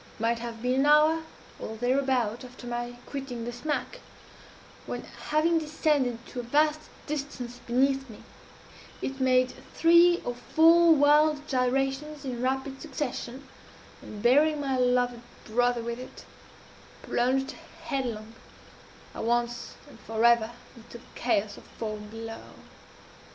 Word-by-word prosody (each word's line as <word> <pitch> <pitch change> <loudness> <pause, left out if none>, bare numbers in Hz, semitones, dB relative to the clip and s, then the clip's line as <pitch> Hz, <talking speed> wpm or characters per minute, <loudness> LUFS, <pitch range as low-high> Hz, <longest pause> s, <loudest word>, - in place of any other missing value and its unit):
It - - -21
might 230 +1 +1
have 230 -1 -7
been 250 +1 +1
an 275 - +3
hour, 305 +2 +5 0.4
or 220 - -6
thereabout, 245 -1 0
after 250 0 -11
my 240 0 -4
quitting 265 -4 -5
the 240 - -4
smack, 300 - -3 0.9
when, - - -4 0.2
having 325 +2 +3
descended 295 -6 0
to 250 - -6
a - - -1
vast 300 +5 +2 0.3
distance 275 -5 -5
beneath 270 +2 +1
me, 215 - -12 0.8
it 270 0 -4
made 255 -1 +3 0.2
three 340 +1 +6
or 245 - -2
four 325 +6 +5
wild 295 +1 +4
gyrations 270 +3 -1
in 245 -2 -4
rapid 265 +1 -2
succession, 265 -1 -5 0.5
and, 210 0 -9
bearing 295 +5 +4
my 275 -2 -1
loved 245 -1 +1 0.2
brother 245 +1 +1
with 235 +1 -4
it, 255 - -11 0.8
plunged 265 +2 0 0.3
headlong, 240 -8 -3 0.8
at - - -5
once 240 +1 -1
and - - -15
forever, 225 0 +3 0.3
into 235 0 -12
the 235 - -17
chaos 210 -4 0
of - - -13
foam 215 -2 -5
below. 225 +1 -7
255 Hz, 130 wpm, -28 LUFS, 240-290 Hz, 0.9 s, three